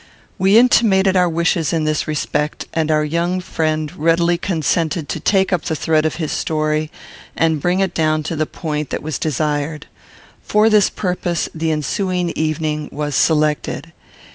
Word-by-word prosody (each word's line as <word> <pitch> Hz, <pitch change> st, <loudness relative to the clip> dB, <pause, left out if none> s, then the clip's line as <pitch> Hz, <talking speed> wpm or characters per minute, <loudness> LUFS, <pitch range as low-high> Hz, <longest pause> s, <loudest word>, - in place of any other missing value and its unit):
We 195 Hz, +3 st, +5 dB
intimated 205 Hz, -6 st, +4 dB
our 180 Hz, -1 st, +3 dB
wishes 165 Hz, -2 st, 0 dB
in 165 Hz, -2 st, 0 dB
this 155 Hz, -1 st, -1 dB
respect, 150 Hz, 0 st, -2 dB
and 160 Hz, -1 st, 0 dB
our 155 Hz, -1 st, +2 dB
young 170 Hz, +4 st, -1 dB
friend 155 Hz, -4 st, -2 dB
readily 170 Hz, +2 st, +2 dB
consented 165 Hz, -2 st, -1 dB
to -, -, -3 dB
take 190 Hz, -1 st, +2 dB
up 175 Hz, -, +1 dB
the 160 Hz, -, -1 dB
thread 155 Hz, 0 st, +1 dB
of -, -, -4 dB
his 160 Hz, -3 st, -3 dB
story 155 Hz, 0 st, -1 dB, 0.5 s
and 160 Hz, -2 st, +1 dB
bring 180 Hz, +4 st, +1 dB
it 190 Hz, -2 st, 0 dB
down 155 Hz, -1 st, +1 dB
to 160 Hz, +2 st, -3 dB
the 155 Hz, 0 st, -1 dB
point 150 Hz, -3 st, -4 dB
that -, -, -4 dB
was 155 Hz, -3 st, -3 dB
desired. 150 Hz, +1 st, -2 dB, 0.6 s
For 215 Hz, +1 st, +3 dB
this 210 Hz, -2 st, +5 dB
purpose, 180 Hz, -2 st, -2 dB
the 160 Hz, 0 st, -2 dB
ensuing 175 Hz, +4 st, -1 dB
evening 155 Hz, -1 st, -2 dB
was 150 Hz, -1 st, -3 dB
selected. 150 Hz, +1 st, 0 dB
160 Hz, 165 wpm, -18 LUFS, 155-180 Hz, 0.6 s, We